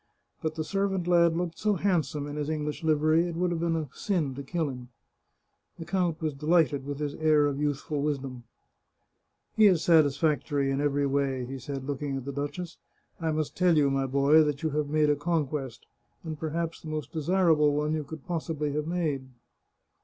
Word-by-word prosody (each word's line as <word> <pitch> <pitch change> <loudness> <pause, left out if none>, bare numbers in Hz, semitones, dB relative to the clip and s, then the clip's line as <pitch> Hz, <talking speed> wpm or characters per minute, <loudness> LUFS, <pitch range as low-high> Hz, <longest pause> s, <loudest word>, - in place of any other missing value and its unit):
But 160 0 -2
the 160 - -2
servant 195 +2 -1
lad 170 -1 +4
looked 170 -2 -3
so 210 -1 +2
handsome 160 -6 0
in 145 0 -6
his 150 0 -3
English 150 -1 -3
livery 155 +2 +3
it 170 - -5
would 180 +1 0
have 170 - -1
been 165 0 0
a 155 -2 -2
sin 165 -9 -1
to 140 - -6
kill 160 +3 -2
him." 125 -2 -7 0.9
The 165 - -7
count 175 -4 -1
was 155 -2 0
delighted 150 -2 +2
with 145 -1 -3
his 145 -1 -3
air 155 -2 +3
of 145 -1 -1
youthful 145 0 -1
wisdom. 135 -4 -3 0.6
" - - -49
He 215 -1 +7
is 180 -5 +3
satisfactory 145 -3 +2
in 135 +1 0
every 145 -1 +1
way," 135 -2 0
he 135 +2 -6
said, 135 +2 -5
looking 140 0 -3
at 130 - -6
the 140 - -3
duchess. 145 +5 -5 0.2
" - - -28
I 160 -1 0
must 155 -1 -2
tell 180 -3 +3
you, 140 -2 +3
my 135 0 0
boy, 140 +4 +5
that 150 -2 -1
you 160 - 0
have 150 0 -1
made 150 0 +3
a - - +2
conquest, 145 -5 -2 0.4
and 155 -3 -6
perhaps 165 +1 -3
the - - -10
most 155 -1 -4
desirable 160 -2 +3
one 150 +1 0
you 155 -1 -1
could 145 0 -10
possibly 160 -4 -2
have 150 +1 -2
made." 155 -6 -1
150 Hz, 200 wpm, -28 LUFS, 140-165 Hz, 0.9 s, He